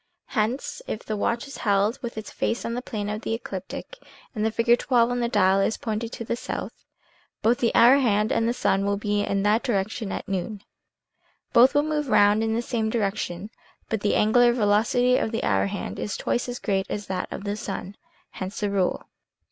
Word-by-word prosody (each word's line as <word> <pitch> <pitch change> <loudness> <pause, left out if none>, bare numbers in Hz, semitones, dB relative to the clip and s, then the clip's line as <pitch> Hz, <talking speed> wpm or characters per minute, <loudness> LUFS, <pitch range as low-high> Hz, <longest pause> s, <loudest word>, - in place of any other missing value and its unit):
Hence, 235 - -1
if 215 - -4
the 215 - -2
watch 235 +5 -1
is 275 - -9
held 205 +2 +1
with 235 -2 -6
its 220 - -6
face 230 - -2
in 235 - -2
the 245 - -2
plane 210 -5 -4
of 210 +1 -3
the 225 - -2
ecliptic, - - -7 0.3
and 215 -4 -2
the 220 - +2
figure 230 +2 +3
XII 250 +1 -3
on 245 +1 +3
the 235 -1 0
dial 195 -3 +3
is 195 - +1
pointed 225 +1 -3
to 230 - -6
the 235 - -1
south, - - -5 0.7
both 235 +2 +3
the 235 - +2
hour 245 +4 +7
hand 215 -5 +2
and 230 0 +2
the - - +2
sun 195 -5 +1
will 200 0 0
be 205 0 0
in 200 -1 0
that 210 +3 +3
direction 215 -2 -2
at - - -5
noon. 195 +2 -3 0.9
Both 250 +3 +6
move 295 -1 +1
round 210 0 +5
in 225 0 0
the 235 - -1
same 225 -3 -1
direction, 205 -3 -2 0.4
but 220 -2 -1
the 205 - +1
angular 240 +3 +4
velocity 235 +3 +3
of 220 - -1
the 225 - -2
hour 95 0 +2
hand 95 - -5
is 205 - -3
twice 245 - -1
as 245 - -4
great 195 -4 -1
as 205 -1 -4
that 185 -2 -4
of - - -6
the 205 0 -2
sun. 200 -1 -6 0.4
Hence 190 +2 -6
the 205 -1 0
rule. 190 -2 0
220 Hz, 210 wpm, -25 LUFS, 205-235 Hz, 0.9 s, hour